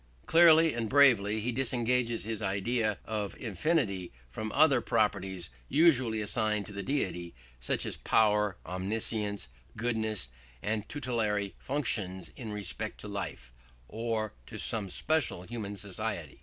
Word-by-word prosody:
Clearly 165 -1 +7
and 115 -2 -2
bravely 110 -7 +5
he 120 +4 -1
disengages 120 -1 0
his 110 +1 -4
idea 105 +2 0
of 105 -2 -3
infinity 110 - 0 0.2
from 110 - -4
other 140 -4 +5
properties 95 - 0 0.2
usually 130 -9 +4
assigned 105 -1 0
to 105 - -10
the 100 - -4
deity, 95 -9 -2 0.2
such - - -1
as - - -3
power, 105 -3 +3
omniscience, 100 +3 -2 0.3
goodness, 110 - -1 0.3
and 105 0 -2
tutelary 110 -8 -1
functions 95 - -2
in 115 -4 -6
respect 105 +1 -4
to - - -6
life, 80 -12 -5 0.3
or 110 -2 -2
to - - -7
some 105 -4 0
special 150 - 0
human 105 -1 -5
society. 100 -4 -4
110 Hz, 130 wpm, -31 LUFS, 100-120 Hz, 0.3 s, Clearly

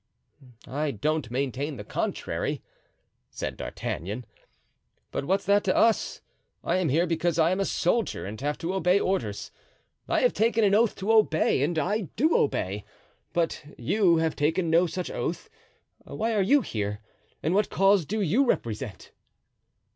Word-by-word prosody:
"I 145 +4 -1
don't 150 +2 -1
maintain 135 +3 -2
the - - -7
contrary," - - -3 0.7
said - - -5
D'Artagnan. 105 +8 -5 0.9
"But - - -3
what's 195 +5 0
that 200 +2 +4
to 185 - +2
us? 225 -1 +2 0.4
I 175 - +1
am 180 -4 +1
here 165 +6 +3
because 170 0 0
I 165 +1 +4
am 185 - 0
a 195 - +1
soldier 210 +6 0
and 105 +5 -7
have 145 +1 -1
to 170 +3 -3
obey 190 0 +3
orders—I 115 - -4
have - - +3
taken 225 0 +2
an 200 -1 +4
oath 225 +1 +3
to 200 +3 -1
obey, 205 -11 +3
and 160 +4 0
I 195 +4 0
do 310 +8 +3
obey; 100 -7 0 0.5
but 170 -2 -1
you 165 - -1
who - - +4
have 160 -1 0
taken 160 +3 +1
no 170 +2 +4
such 180 +2 -4
oath, 170 - -4 0.5
why 225 +1 -2
are 210 - +2
you 275 +9 +4
here 105 - -3 0.4
and 160 - +1
what 205 +1 +2
cause 195 -1 +4
do 210 +8 -2
you 200 - +3
represent?" 110 - -2
170 Hz, 160 wpm, -27 LUFS, 145-200 Hz, 0.9 s, that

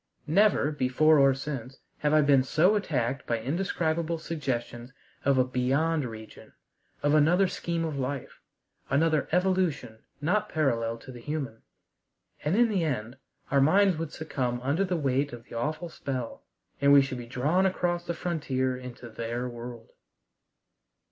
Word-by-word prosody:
Never, 185 -2 +3
before 150 +2 +3
or 135 -1 +5
since, 135 -2 -6 0.2
have 150 - +1
I 155 0 +5
been 140 -2 +5
so 155 +9 +3
attacked 140 - -1
by 115 -1 0
indescribable 165 - -1
suggestions 130 -6 -4 0.3
of 140 -1 +3
a 130 - +5
"beyond 135 +5 +1
region," 110 -2 -10 0.5
of 145 0 +3
another 170 +6 +4
scheme 170 -2 -2
of 150 -3 -3
life, 135 +1 -4 0.5
another 155 +2 +2
evolution 175 -10 0 0.2
not 180 +8 0
parallel 115 -7 0
to 130 - -11
the 125 - -10
human. 135 -6 -4 0.8
And 150 +5 +1
in 240 0 +5
the 195 -5 +1
end 125 -4 -3 0.3
our 140 0 +4
minds 190 +4 +4
would 160 -2 -4
succumb 130 -6 -3
under 145 +8 +1
the 180 -2 -1
weight 140 -2 0
of 120 -1 -8
the - - -15
awful 155 +8 -3
spell, 130 -6 -5 0.4
and 140 0 +5
we 140 -1 +8
should 130 -2 -5
be 120 - -8
drawn 150 +11 +2
across 175 -2 -1
the 170 - -2
frontier 135 -7 -1
into 125 -1 -9
their 115 +2 -4
world. 120 -1 -9
140 Hz, 155 wpm, -28 LUFS, 125-165 Hz, 0.8 s, we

